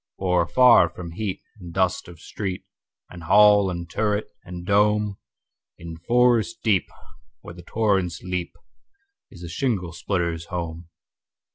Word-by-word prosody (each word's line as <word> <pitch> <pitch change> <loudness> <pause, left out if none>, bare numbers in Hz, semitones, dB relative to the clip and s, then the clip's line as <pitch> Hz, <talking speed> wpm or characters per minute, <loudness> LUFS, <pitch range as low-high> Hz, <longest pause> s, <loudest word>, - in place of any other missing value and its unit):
For 90 -2 +1
afar 120 -6 +5
from 85 0 -9
heat 95 +2 -5 0.2
and 90 -3 -10
dust 95 0 0
of 85 -2 -13
street, 95 +1 -6 0.5
And 90 - -10
hall 105 +1 +5
and 85 -1 -5
turret, 105 +4 -2
and 90 0 -9
dome, 105 0 +1 0.6
In 85 -1 -9
forest 120 +3 +1
deep, 105 -5 +2 0.5
where 85 - -10
the 90 - -12
torrents 95 -3 -1
leap, 90 -1 -4 0.7
Is 90 -2 -13
the - - -6
shingle 90 -1 -2
splitter's 85 -2 -2
home. 85 -1 -6
90 Hz, 135 wpm, -23 LUFS, 85-105 Hz, 0.7 s, afar